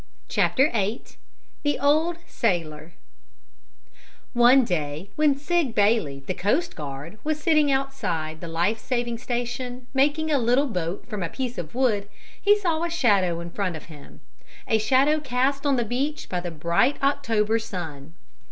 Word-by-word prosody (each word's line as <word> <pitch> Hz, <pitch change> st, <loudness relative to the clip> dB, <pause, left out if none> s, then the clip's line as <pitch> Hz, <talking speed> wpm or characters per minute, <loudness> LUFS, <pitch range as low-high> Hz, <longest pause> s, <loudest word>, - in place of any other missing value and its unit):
CHAPTER 270 Hz, +3 st, +3 dB
VIII 215 Hz, +1 st, -1 dB, 0.6 s
THE 290 Hz, -1 st, 0 dB
OLD 310 Hz, +5 st, +2 dB
SAILOR 165 Hz, -7 st, -2 dB, 1.4 s
One 245 Hz, +2 st, +6 dB
day, 155 Hz, 0 st, -3 dB
when 300 Hz, -2 st, +3 dB
Sig 295 Hz, -3 st, 0 dB
Bailey, 200 Hz, -10 st, +2 dB
the 185 Hz, -, -2 dB
coast 270 Hz, -, 0 dB
guard, 150 Hz, +6 st, -7 dB
was 305 Hz, 0 st, -1 dB
sitting 305 Hz, -2 st, +3 dB
outside 170 Hz, -13 st, -2 dB
the 170 Hz, -, -6 dB
life 170 Hz, +7 st, 0 dB
saving 240 Hz, -1 st, -2 dB
station, 245 Hz, +1 st, -4 dB
making 295 Hz, +4 st, +2 dB
a 285 Hz, -, +3 dB
little 245 Hz, +4 st, +3 dB
boat 180 Hz, -, -3 dB
from 210 Hz, -4 st, -5 dB
a 170 Hz, -, -2 dB
piece 250 Hz, 0 st, -4 dB
of 165 Hz, +4 st, -7 dB
wood, 215 Hz, -6 st, +1 dB, 0.3 s
he 410 Hz, +1 st, +5 dB
saw 340 Hz, -6 st, 0 dB
a 340 Hz, -, 0 dB
shadow 200 Hz, -, +2 dB
in 170 Hz, 0 st, -7 dB
front 185 Hz, -3 st, -2 dB
of 160 Hz, -, -9 dB
him 145 Hz, -2 st, -15 dB, 0.5 s
a 220 Hz, -, +3 dB
shadow 270 Hz, +7 st, +3 dB
cast 275 Hz, +1 st, 0 dB
on 280 Hz, -, +3 dB
the 240 Hz, -2 st, 0 dB
beach 275 Hz, +7 st, -2 dB
by 180 Hz, -, -1 dB
the 175 Hz, 0 st, -4 dB
bright 170 Hz, -, +1 dB
October 230 Hz, -6 st, +2 dB
sun. 165 Hz, -8 st, -7 dB
235 Hz, 155 wpm, -25 LUFS, 175-280 Hz, 1.4 s, One